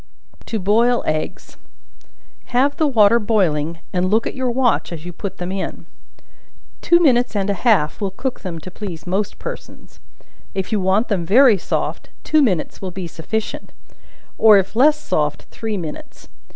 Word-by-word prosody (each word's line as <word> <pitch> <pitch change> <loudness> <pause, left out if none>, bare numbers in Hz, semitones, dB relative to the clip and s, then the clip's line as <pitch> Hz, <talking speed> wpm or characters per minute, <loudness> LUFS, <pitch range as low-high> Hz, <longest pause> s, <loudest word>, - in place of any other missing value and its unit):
To 225 - -2
Boil 230 +5 +2
Eggs. 155 0 -4 0.9
Have 270 +4 +1
the 310 - +2
water 230 -3 +5
boiling, 170 -7 0
and 185 0 +1
look 220 +3 +2
at - - -3
your 260 -1 -2
watch 245 -4 +1
as 165 -1 -7
you 180 - -7
put 195 +2 -6
them 180 +1 -4
in; 190 -1 -5 1.0
two 345 - +4
minutes 250 -8 +3
and 200 0 0
a 200 - -5
half 205 -8 +2
will 200 - 0
cook 255 +7 -4
them 175 -3 -6
to 185 - -9
please 180 -5 -7
most 195 +3 -2
persons; - - -9 0.6
if 190 +1 -3
you 215 - +1
want 190 +5 +2
them 195 -5 -1
very 220 +3 +5
soft, - - -3
two 310 - +3
minutes 190 - 0
will 190 - -4
be 185 0 -6
sufficient, 190 +7 -5 0.7
or 215 -2 +7
if 195 +2 -1
less 295 +5 +5
soft 150 - -1
three 220 -2 -4
minutes. 160 -5 -8
205 Hz, 165 wpm, -20 LUFS, 180-235 Hz, 1.0 s, or